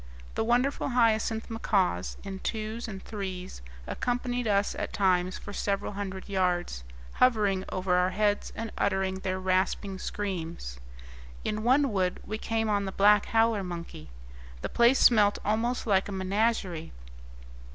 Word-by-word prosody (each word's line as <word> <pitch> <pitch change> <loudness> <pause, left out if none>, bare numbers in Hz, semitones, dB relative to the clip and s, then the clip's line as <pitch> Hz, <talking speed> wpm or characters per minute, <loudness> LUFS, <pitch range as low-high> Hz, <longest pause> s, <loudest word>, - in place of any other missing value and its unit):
The - - 0
wonderful 245 +6 +1
hyacinth 225 -2 +2
macaws, 195 - 0
in 195 -1 -6
twos 220 +3 -3
and 195 -3 -7
threes, 190 - -6 0.2
accompanied 245 -1 -2
us 200 -1 +2
at - - -4
times 185 -2 +2
for 205 - -9
several 200 0 -1
hundred 195 -2 -5
yards, 180 - 0 0.3
hovering 205 -6 +2
over 185 -1 -1
our 180 0 +3
heads 205 +2 0
and 225 -1 -4
uttering 190 -1 0
their 185 0 -2
rasping 190 +1 0
screams. 165 - -4 0.6
In 215 0 -2
one 260 +3 +3
wood 185 -2 0
we 215 +1 -4
came 225 0 -1
on 205 -1 +1
the 190 - -3
black 205 +1 +5
howler 225 -2 +2
monkey. 170 - -7 0.5
The - - -2
place 235 +3 +4
smelt 210 -4 +5
almost 230 +4 0
like 195 -4 +2
a - - -4
menagerie. 190 - -1
200 Hz, 140 wpm, -28 LUFS, 185-225 Hz, 0.6 s, black